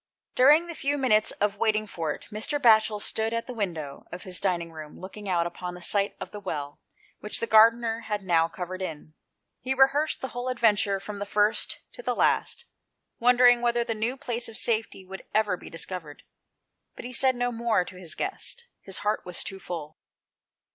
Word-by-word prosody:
Buring 300 +7 +6
the 340 - -5
few 290 -2 -1
minutes 215 -6 +3
of 205 0 -1
waiting 215 0 +1
for 165 -6 -3
it - - -7
Mr. 220 +7 -2
'Batchel 220 -4 +5
stood 220 +2 0
at 230 - -2
the 250 - -7
window 165 - -4
of 175 - -7
his 185 -1 -3
dining 170 -3 -1
room 155 -2 -10
looking 200 +2 -8
out 170 -2 +2
upon 180 +1 -5
the 180 - -11
site 200 +2 +1
of - - -7
the 210 - -7
well 145 -7 -5 0.4
which 210 - -3
the - - 0
gardener 225 +1 +5
had 210 -3 -4
now 165 -3 +3
covered 185 +2 -6
in. 155 -3 -6 0.5
He 265 +1 -2
rehearsed 275 +3 +3
the 265 - -3
whole 245 +1 -5
of 255 - -1
the - - -16
adventure 205 -4 +3
from 205 +1 -6
first 210 +1 +1
to - - -3
last, - - +1 0.5
wondering 245 0 +6
whether 240 0 +2
the 230 - -2
:^w 230 +5 -2
place 240 -1 -3
of 225 - -8
safety 220 -4 -1
would 190 +1 -9
ever 215 -3 +3
be - - -11
discovered. 165 -2 -6 0.7
But - - -9
he 250 - -6
said 260 +1 +3
no 245 0 0
more 230 -5 +1
to 185 - -10
his 180 -3 -7
guest; 475 +4 -3 0.2
his 195 - -4
heart 210 +1 +1
was 180 -1 -2
too 195 - -4
full. 160 -5 -7
210 Hz, 195 wpm, -27 LUFS, 180-240 Hz, 0.7 s, Buring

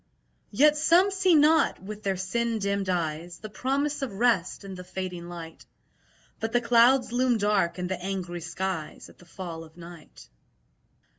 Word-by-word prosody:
Yet 295 +7 +4
some 345 +6 +4
see 380 -3 +3
not 305 +2 +4
(with 210 +3 -8
their 195 -2 -1
sin 230 +5 -1
dimmed 200 -2 -1
eyes) 170 -1 -2
The 215 - -10
promise 280 +5 -1
of 270 - -3
rest 200 -3 +1
in 195 - -7
the 180 -1 -8
fading 180 -1 -6
light; 165 -2 -9 0.8
But 225 0 -3
the 240 - +4
clouds 245 +2 +4
loom 245 -1 +2
dark 205 -4 +1
in 180 - -3
the 180 0 -4
angry 180 -3 -4
skies 175 -1 -5
At - - -19
the 175 - -17
fall 170 -2 -7
of 160 +1 -17
night. 170 - -13
195 Hz, 165 wpm, -27 LUFS, 175-245 Hz, 0.8 s, Yet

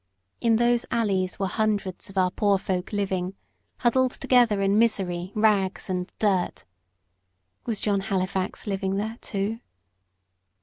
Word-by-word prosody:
In 230 -1 +3
those 240 +1 +3
alleys 195 -5 0
were 195 - -1
hundreds 205 0 -1
of 195 - -10
our 185 -1 +3
poor 200 0 +2
folk 185 -1 -3
living, 190 -2 -2 0.5
huddled 255 +1 +3
together 240 -5 +3
in 195 +2 +3
misery, 185 -5 +1
rags, 205 -4 +2
and 180 0 -3
dirt. 190 - 0 1.0
Was 220 -4 -1
John 200 -2 +1
Halifax 190 -1 -2
living 195 -2 -1
there 220 +3 -3
too? 205 +3 -2
200 Hz, 130 wpm, -25 LUFS, 190-220 Hz, 1.0 s, In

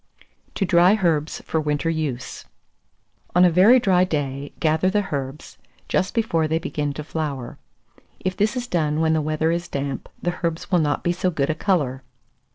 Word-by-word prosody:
TO 195 - 0
DRY 180 +2 +5
HERBS 160 -7 0
FOR 160 - -1
WINTER 150 +2 0
USE. 145 -6 -4 0.9
445. - - -34
On 180 +1 +7
a 175 - +3
very 210 +9 +7
dry 185 -6 +3
day, 145 -5 -3
gather 160 +3 +2
the 205 0 0
herbs, 135 +1 -5 0.3
just 190 +4 0
before 170 -9 +1
they 160 +1 +1
begin 150 -3 -2
to 150 - -6
flower. 145 -5 -4 0.6
If 185 0 -2
this 215 +6 0
is 245 - -2
done 155 -8 0
when 160 0 +2
the 160 - +1
weather 155 +2 0
is 170 +1 -2
damp, 140 -3 -4
the 175 0 -3
herbs 165 -1 -3
will 180 - +4
not 150 -2 0
be 175 - +1
so 180 +1 0
good 150 -4 0
a - - 0
colour. 150 -8 0
160 Hz, 185 wpm, -23 LUFS, 150-180 Hz, 0.9 s, On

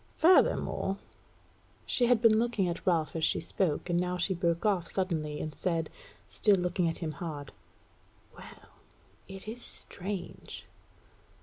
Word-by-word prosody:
Furthermore 315 - +3 0.5
" - - -33 0.3
She 245 - +2
had 240 -1 +3
been 220 -1 +6
looking 230 -5 +1
at 170 +1 -4
Ralph 165 -4 +2
as 160 - -2
she - - +3
spoke, 170 -1 -1
and 175 -1 +1
now 180 0 -1
she 185 +2 0
broke 170 +1 0
off 190 -5 +2
suddenly, 160 -6 -2
and 155 - -4
said, 165 -2 -1 0.4
still 205 -2 +3
looking 180 -1 +1
at 165 - -4
him 160 -3 -3
hard; 145 -2 -6 0.8
"Well, - - -13 0.6
it 195 +1 -9
is 235 +3 -6
strange!" 190 -4 -5
180 Hz, 145 wpm, -30 LUFS, 165-200 Hz, 0.8 s, been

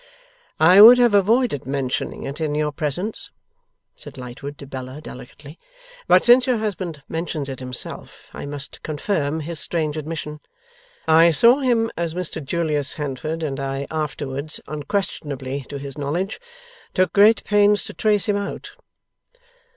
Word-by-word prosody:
'I 180 +5 +7
would 235 +3 +11
have 240 -3 +4
avoided 205 - +2
mentioning 135 -2 -3
it 140 +4 -6
in 150 -2 -1
your 150 0 0
presence,' 160 +8 -3 0.7
said - - -12
Lightwood 130 +3 -8
to - - -10
Bella, 130 0 -7
delicately; 145 +2 -12 0.5
'but - - +5
since 250 +1 +6
your 250 -2 +2
husband 185 -9 -4
mentions 160 -3 -4
it 130 - -6
himself, 125 -1 -8
I - - -7
must 145 -1 -7
confirm 155 -1 -2
his 160 +1 -3
strange 155 0 0
admission. 150 -1 -5 0.7
I 165 +1 +6
saw 235 - +5
him 235 -4 +1
as 170 -1 -3
Mr 175 -3 -4
Julius 150 -1 0
Handford, 150 +3 -4
and 140 -3 -3
I 135 0 -3
afterwards 150 -1 -4
(unquestionably 145 -5 -4
to 145 - -5
his 140 0 -8
knowledge) 170 +8 -2 0.6
took 185 0 +2
great 210 +2 +5
pains 205 0 +3
to - - -9
trace 210 -2 +1
him 205 -1 +1
out. 200 0 -5
155 Hz, 145 wpm, -22 LUFS, 140-200 Hz, 0.7 s, would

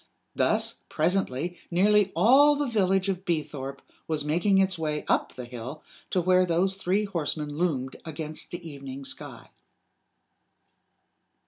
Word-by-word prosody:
Thus, - - +2
presently, 175 -1 0
nearly 200 +2 +3
all 270 - +6
the 290 0 0
village 195 -5 +1
of 190 -1 -2
Beethorpe 145 -5 -3 0.2
was 155 -2 -1
making 175 +6 +2
its 190 -1 +3
way 155 -2 -2
up - - +1
the 125 - -6
hill 125 +5 -8 0.3
to 185 - +1
where 185 +1 +4
those 180 +2 +1
three 195 +2 0
horsemen 155 -5 -2
loomed 145 -6 -1
against 155 -1 -6
the 175 -1 -7
evening 140 -2 -8
sky. - - -7
170 Hz, 130 wpm, -27 LUFS, 150-190 Hz, 0.3 s, all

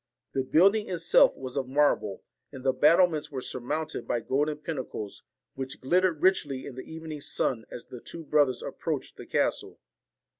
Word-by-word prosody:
The 135 - 0
build 180 +10 +5
ing 215 -1 -2
itself 175 -2 +4
was 130 0 -7
of 135 -2 -1
marble, 130 -8 +1 0.3
and 130 -3 -9
the 135 -1 +3
battlements 160 +2 +4
were 135 -3 -4
surmounted 150 +6 -3
by 120 - +1
golden 145 +5 0
pinnacles, 135 -9 -5 0.3
which 130 0 -6
glittered 175 +3 +2
richly 145 -8 +2
in 140 - -7
the 130 +4 -9
evening 160 -2 -7
sun 120 -4 -1
as 120 - -8
the 125 - -10
two 165 - -7
brothers 145 -4 +2
ap - - -7
proached - - -3
the - - -10
castle. - - -1
145 Hz, 175 wpm, -28 LUFS, 130-160 Hz, 0.3 s, build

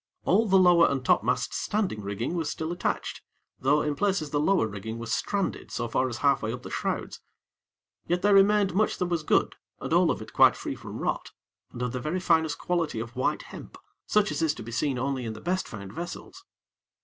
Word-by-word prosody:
All 215 +5 +3
the 190 -1 +5
lower 175 -2 +6
and 135 -2 -2
topmast 125 +3 +2
standing 200 - -1
rigging 100 - -3
was 165 -4 -1
still 160 +1 -3
attached, 175 - -3 0.4
though 145 +3 +3
in 150 -1 -1
places 185 -4 0
the 145 - +1
lower 180 -1 +3
rigging 110 +2 -6
was 115 0 -4
stranded 200 -2 -2
so 120 - -3
far 130 +3 0
as 120 - -5
half 140 0 +2
way 110 - -2
up 125 +1 -7
the - - -8
shrouds; - - -3 0.9
yet 175 +1 0
there 205 0 +5
remained 200 0 +5
much 210 +3 +1
that 180 - 0
was 170 -2 -1
good 155 - +1 0.2
and - - -3
all - - +4
of - - 0
it - - -10
quite - - +6
free - - -4
from - - -8
rot, - - -2 0.4
and 120 - -5
of 125 - -1
the 125 - -3
very 155 +8 -2
finest 160 -4 +2
quality 170 -9 -1
of 115 +1 -6
white 130 - 0
hemp, - - -11 0.3
such 210 0 +2
as - - -2
is 160 -2 +1
to - - -8
be 115 - -8
seen 135 +2 0
only 130 0 -2
in 110 -2 -4
the 110 - -9
best 185 +6 -1
found 100 -3 -8
vessels. 175 - -8
150 Hz, 220 wpm, -27 LUFS, 120-180 Hz, 0.9 s, lower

